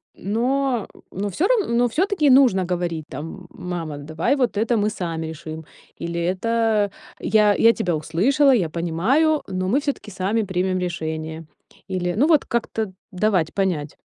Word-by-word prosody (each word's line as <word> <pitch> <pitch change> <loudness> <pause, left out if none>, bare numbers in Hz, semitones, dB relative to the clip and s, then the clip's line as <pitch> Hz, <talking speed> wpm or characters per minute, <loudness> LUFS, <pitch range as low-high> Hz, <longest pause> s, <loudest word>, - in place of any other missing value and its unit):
Но 245 +3 0 0.2
но 200 +2 -3
всё 350 - +1
равно, 425 - +1
но 245 +1 +4
всё-таки 355 - +2
нужно 250 -9 +5
говорить 170 -3 -2
там: 150 +5 -6 0.2
"М 180 - -9
мама, 165 -4 -4
давай 160 - -1
вот 250 -6 0
это 230 +2 +2
мы 210 +1 +2
сами 165 -6 -4
решим" 160 0 -7 0.4
или: 170 0 -3
"Это 215 +3 +1 0.3
я, 210 -2 +3
я 230 0 +5
тебя 175 -6 -1
услышала, 210 - +3
я 195 -11 +2
понимаю, 195 - +1
но 185 -1 -2
мы 250 +8 +3
всё-таки 280 -7 -4
сами 195 +4 0
примем 185 -1 -1
решение". 160 -2 -4 0.4
Или 180 -2 -1
ну 285 +6 +4
вот 310 -4 +4
как-то 225 -3 -2 0.2
давать 185 -4 +1
понять. 175 -7 -1
190 Hz, 155 wpm, -22 LUFS, 170-235 Hz, 0.4 s, нужно